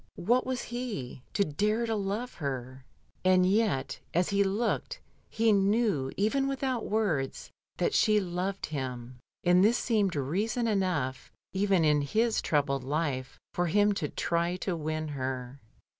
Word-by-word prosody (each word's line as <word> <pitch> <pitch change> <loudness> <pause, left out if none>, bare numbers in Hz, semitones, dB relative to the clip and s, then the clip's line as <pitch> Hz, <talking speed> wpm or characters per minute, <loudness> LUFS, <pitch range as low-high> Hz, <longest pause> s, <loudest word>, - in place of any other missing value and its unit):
What 245 +8 +2
was 255 -1 -2
he, 235 - -5
to 200 - +2
dare 210 +9 0
to 225 - -1
love 210 +5 -2
her? 130 -2 -4 0.4
And 185 0 +5
yet, 195 -8 +1 0.2
as 175 +1 +2
he 200 0 +3
looked, 225 - -1 0.3
he 225 0 +2
knew, 200 - +2
even 270 +7 +1
without 265 -3 -2
words, 180 -12 -1 0.3
that 435 - +1
she 215 -1 +4
loved 185 +1 -2
him, 125 -4 -5 0.2
and 180 +1 +5
this 225 +4 +4
seemed 205 -7 +1
reason 200 - -1
enough, 180 - -1 0.2
even 190 -3 +2
in 150 -1 +4
his 220 +10 +1
troubled 140 -3 0
life, 135 -2 -2 0.2
for 175 0 0
him 205 +4 +3
to 150 -7 -2
try 170 +1 0
to 185 0 -2
win 155 0 -3
her. 130 -1 -4
185 Hz, 145 wpm, -29 LUFS, 145-215 Hz, 0.4 s, And